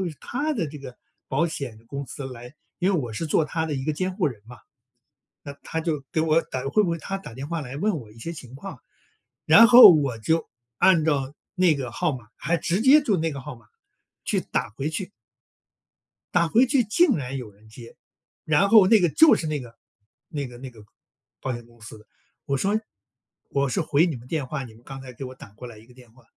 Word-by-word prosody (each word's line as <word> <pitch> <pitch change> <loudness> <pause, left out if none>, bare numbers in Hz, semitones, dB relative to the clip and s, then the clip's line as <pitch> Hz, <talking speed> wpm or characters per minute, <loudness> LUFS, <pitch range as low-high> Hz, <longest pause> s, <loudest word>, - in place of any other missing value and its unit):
会 175 - -3
是 155 - -13
他 290 +5 -2
的 215 - -2
这 150 +1 -9
个 135 -3 -10 0.3
保 150 +6 +1
险 135 -8 -6
公 140 +3 -5
司 135 +1 -7
来 125 -1 -10 0.3
因 190 +2 +2
为 175 - +1
我 120 -4 -6
是 160 +10 -4
做 155 +1 +2
他 160 +2 -2
的 155 -2 -3
一 130 - -4
个 155 - 0
监 185 +4 -3
护 190 - +1
人 115 -8 -5
嘛。 120 +1 -12 0.9
那 140 - -7
它 160 - -3
就 155 -4 -3
给 160 - +1
我 160 0 +3
打 130 -5 -6
会 210 +9 +3
不 180 - -1
会 170 - -1
它 195 +4 -5
打 195 - -11
电 135 +4 -7
话 165 -1 -3
来 135 -1 -7
问 200 +2 0
我 110 -6 -13
一 - - -21
些 165 +9 -6
情 130 -6 -11
况。 135 - -9 0.7
然 185 +10 +8
后 245 +1 +11
我 140 -6 0
就 160 +9 0 0.3
按 170 -5 +4
照 140 -3 -1 0.2
那 180 -4 +4
个 130 -4 -5
号 160 +7 -1
码， 120 -4 -14
还 170 - -1
直 175 +5 -1
接 280 +4 +6
就 215 -8 +1
那 165 -1 -1
个 140 - -6
号 135 -1 -9
码， 115 - -22 0.6
去 - - 0
打 - - -3
回 135 +8 -4
去。 180 +5 -5 1.2
打 170 -1 +3
回 240 +9 +4
去 250 -1 +2
竟 265 - +3
然 135 -1 -5
有 125 -5 -7
人 105 +2 -22
接， 115 +1 -13 0.5
然 160 +6 +3
后 210 -2 +7
那 215 +2 +5
个 175 - +3
就 315 - +6
是 160 - -3
那 155 -1 -2
个 120 -2 -12 0.5
那 145 -2 -4
个 120 -1 -12
那 130 0 -8
个 110 -3 -16 0.6
保 130 - -3
险 120 -1 -8
公 120 -1 -23
司 110 -1 -11
的， 105 - -19 0.4
我 140 - -1
说： 200 +9 +1 0.7
“我 140 0 0
是 180 - -1
回 155 +1 +2
你 165 - -2
们 125 0 -11
电 155 -3 -2
话， 140 +1 -4
你 120 -4 -10
们 115 - -20
刚 135 0 -9
才 130 - -10
给 125 +3 -8
我 130 0 -8
打 130 - -13
过 125 +4 -11
来 115 - -11
一 110 +1 -17
个 125 - -19
电 125 -3 -18
话。” 130 +1 -22
145 Hz, 255 characters per minute, -24 LUFS, 125-170 Hz, 1.2 s, 后